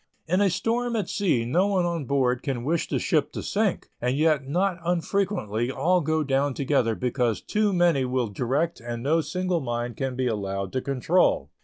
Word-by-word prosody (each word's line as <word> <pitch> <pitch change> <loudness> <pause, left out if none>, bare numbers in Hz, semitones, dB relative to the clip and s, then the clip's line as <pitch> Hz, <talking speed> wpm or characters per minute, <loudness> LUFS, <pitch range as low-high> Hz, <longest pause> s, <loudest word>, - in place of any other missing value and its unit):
In 180 +4 +1
a 200 - +4
storm 235 +5 -1
at 205 -6 -1
sea 175 - +1
no 175 +11 +2
one 190 -3 +1
on 170 -4 -2
board 125 -2 +1
can 130 -5 -3
wish 160 +5 0
the - - -1
ship - - +1
to - - -5
sink, - - -1
and 125 +3 0
yet 150 -3 +2
not 180 +4 0
unfrequently 170 - -1
all 180 +6 +2
go 155 +1 0
down 135 -1 0
together 130 -5 +1
because 125 -2 0
too 210 -1 0
many 175 -7 +3
will 125 -1 0
direct 135 - -1
and 120 0 -6
no 160 +4 +2
single 180 +1 -1
mind 120 -1 -3
can 135 -2 -2
be 130 0 -1
allowed 100 -4 -2
to 130 - 0
control. 140 +7 +1
140 Hz, 190 wpm, -25 LUFS, 125-175 Hz, -, a